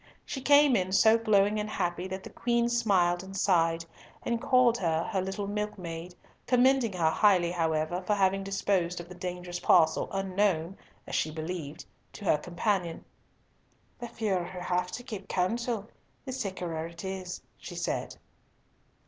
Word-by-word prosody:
She 270 - -5
came 285 -1 +6
in 185 -2 0
so 220 +2 +6
glowing 210 -1 +3
and 210 0 -3
happy 175 -2 -2
that 190 0 -6
the - - -10
Queen 235 0 +1
smiled 190 -7 +2
and 195 +1 -8
sighed, 165 -3 +2 0.4
and 235 -1 -1
called 250 -2 +4
her 165 -2 +1
her 190 0 -1
little 195 +2 -3
milkmaid, 180 -5 -5 0.3
commending 250 -3 +3
her 165 -3 +2
highly, 180 -3 +4
however, 160 0 0
for 205 +3 0
having 195 0 +2
disposed 195 -3 0
of 175 - -8
the - - -8
dangerous 180 0 -5
parcel 165 -3 +4
unknown 195 -2 0 0.3
(as - - -9
she 155 - +1
believed) 155 -1 -6 0.3
to 205 - -9
her 150 - +3
companion. 175 0 -2 0.9
"The 240 - -5
fewer 205 -6 -1
who 180 +1 -7
have 180 0 -1
to 245 +2 -5
keep 215 -6 -7
counsel, 220 +3 -1 0.4
the 265 - -4
sickerer 180 -9 -3
it 170 +3 -10
is," 190 -1 -5 0.2
she - - -9
said. - - -3
190 Hz, 155 wpm, -29 LUFS, 175-210 Hz, 0.9 s, came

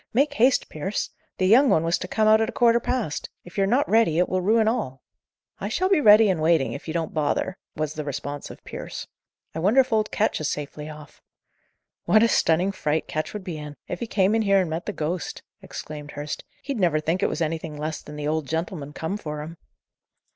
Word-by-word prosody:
"Make 285 +3 +3
haste, 255 0 +3
Pierce! 190 +7 -3 0.3
the 185 - +1
young 250 +8 +6
one 160 - +3
was 165 0 +1
to - - -5
come 215 +3 +1
out 220 +1 +6
at 220 - +1
a - - -3
quarter 235 0 +4
past. 235 - -2
If 175 - -14
you're 195 -1 +2
not 250 +7 +2
ready, 220 -8 +3
it 180 - +3
will 185 0 0
ruin 220 +3 +3
all." 215 - -2 0.6
"I - - -3
shall 370 +1 +1
be 380 -6 +4
ready 215 -1 +8
and 180 -5 +1
waiting, 160 -3 +3
if 140 - -8
you 160 - -3
don't 165 -2 -2
bother," 155 +4 0 0.2
was 155 -1 -2
the 155 - -4
response 145 0 -5
of - - -12
Pierce. - - -7 0.5
"I 160 - -4
wonder 205 +10 +4
if 260 -2 +3
old 215 -1 +2
Ketch 215 -6 0
is 150 - 0
safely 150 +1 -5
off?" 150 -1 -12 0.8
"What 215 +1 +5
a - - +6
stunning 180 -2 +2
fright 160 -5 -1
Ketch 155 0 -3
would 210 -2 -5
be 175 -5 -5
in, 150 -1 -8
if - - -4
he 235 - -3
came 195 -1 +2
in 225 - +3
here 195 -2 +4
and 175 -4 -3
met 165 +2 -4
the - - 0
ghost!" 170 0 -4 0.2
exclaimed 150 -1 -8
Hurst. 145 +1 -5 0.2
"He'd 275 -5 -3
never 170 -5 +3
think 165 +4 -1
it - - +2
was - - -3
anything 160 -1 -2
less 155 +1 -4
than 150 - -10
the 150 0 -3
Old 155 -2 -1
Gentleman 160 -2 -3
come 165 +7 -3
for 150 -6 -5
him." 165 +2 -8
170 Hz, 230 wpm, -24 LUFS, 155-215 Hz, 0.8 s, ready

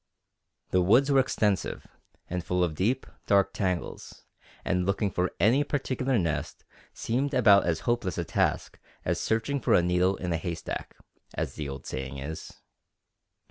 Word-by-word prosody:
The 90 - +4
woods 125 +10 +4
were 135 - +5
extensive, 105 -6 0 0.4
and 90 0 -3
full 90 +1 0
of 85 -3 0
deep, 115 +11 0 0.2
dark 100 -1 +3
tangles, 90 -3 -3 0.4
and 90 0 +1
looking 100 +2 0
for 90 0 0
any 115 +10 +4
particular 135 -3 -1
nest 85 -6 -2 0.3
seemed 135 +4 -1
about 100 -7 +6
as 80 -2 0
hopeless 120 -7 -1
a 85 - 0
task - - -1 0.3
as - - 0
searching 115 +5 0
for - - +3
a 90 - +4
needle 90 +2 +2
in 90 -2 -3
a - - +1
haystack, 85 0 -5 0.4
as - - -2
the 75 -2 -5
old 70 0 -7
saying 65 +1 -5
is. 75 +4 -6
95 Hz, 155 wpm, -28 LUFS, 85-120 Hz, 0.4 s, about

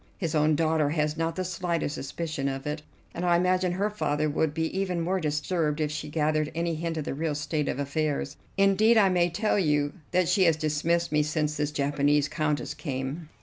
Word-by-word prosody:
His 165 -6 -2
own 155 0 +3
daughter 160 -2 +2
has 150 0 0
not 165 +1 -1
the 185 - -1
slightest 170 -4 -2
suspicion 150 +1 -3
of 135 0 -3
it, 150 +1 -3 0.3
and 175 - -4
I 175 -1 +4
imagine 180 0 +2
her 200 +3 0
father 155 -7 0
would 160 +1 +1
be 160 +1 -1
even 190 -2 -1
more 180 +3 0
disturbed 150 0 -1
if 150 -1 0
she 150 0 -5
gathered 155 0 0
any 170 0 0
hint 165 +1 -3
of 155 - -2
the - - -3
real 155 +1 -2
state 150 0 -1
of - - -2
affairs. 145 0 -1 0.2
Indeed, 200 +4 +4
I 200 -3 +6
may 175 -1 +2
tell 205 +4 +1
you 150 -4 +1 0.2
that 180 -1 +2
she 185 +1 +4
has 165 -2 +4
dismissed 160 +3 0
me 150 0 +3
since 150 0 -1
this 150 -1 -1
Japanese 145 0 +1
Countess 150 -5 -1
came." 140 +2 -5
155 Hz, 205 wpm, -27 LUFS, 150-175 Hz, 0.3 s, I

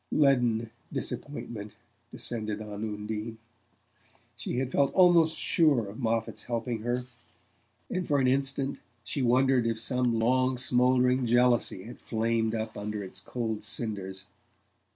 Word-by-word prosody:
Leaden 120 -6 +3 0.2
disappointment 120 -6 -5 0.3
descended 110 -3 -3
on 105 -1 -6
Undine. 105 +1 -4 1.0
She - - -4
had 130 0 -1
felt 140 0 +2
almost 170 -3 +5
sure 145 -10 +3
of 100 +5 -9
Moffatt's 115 -2 -1
helping 115 -1 -2
her, 120 +2 -1 0.8
and 185 -1 -3
for 145 - +2
an 130 - +2
instant 135 +1 0 0.2
she 140 - -3
wondered 130 0 +3
if 115 -1 -1
some 125 -1 +1
long 130 +3 +2
smouldering 125 0 +3
jealousy 120 -5 +3
had 120 - -10
flamed 115 0 0
up 110 0 -4
under 105 0 -4
its 95 0 -6
cold 110 +1 -4
cinders. 100 -4 -2
120 Hz, 130 wpm, -29 LUFS, 110-130 Hz, 1.0 s, almost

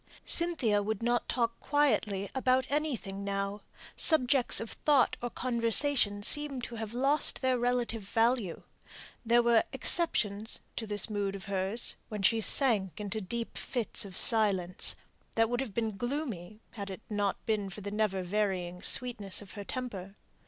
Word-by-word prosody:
Cynthia 295 -12 +4
would 220 +1 -3
not 240 0 0
talk 235 -2 -1
quietly 215 -9 0
about 260 0 +1
anything 250 -10 -2
now; 200 +1 -3 0.3
subjects 270 -5 +5
of 225 - -6
thought 285 -4 +2
or 245 - -3
conversation 235 -2 +1
seemed 285 0 +1
to 235 - -6
have 220 +1 -6
lost 275 +3 0
their 255 -1 +1
relative 240 -2 -1
value. 225 -2 0 0.6
There 240 +1 +3
were 235 -1 +4
exceptions 225 - 0 0.2
to 225 - -3
this 205 0 -1
mood 205 -2 -2
of 195 - -9
hers, 195 +3 -1
when 210 -3 -5
she 225 +3 +3
sank 215 - +2
into 210 +1 -3
deep 230 +5 -4
fits 240 -4 0
of 190 -3 -6
silence, 195 -6 +3 0.4
that 225 0 +2
would 245 0 -1
have 230 -7 -6
been 220 -3 -2
gloomy 230 - -5
had 200 -4 -7
it 190 +2 -8
not 205 -2 -2
been 210 -3 -1
for 200 +3 -9
the 200 +1 -6
never 210 -3 -1
varying 180 -2 -2
sweetness 225 -6 +2
of 200 -2 -11
her 205 - -8
temper. 200 -5 -6
220 Hz, 155 wpm, -30 LUFS, 200-245 Hz, 0.6 s, subjects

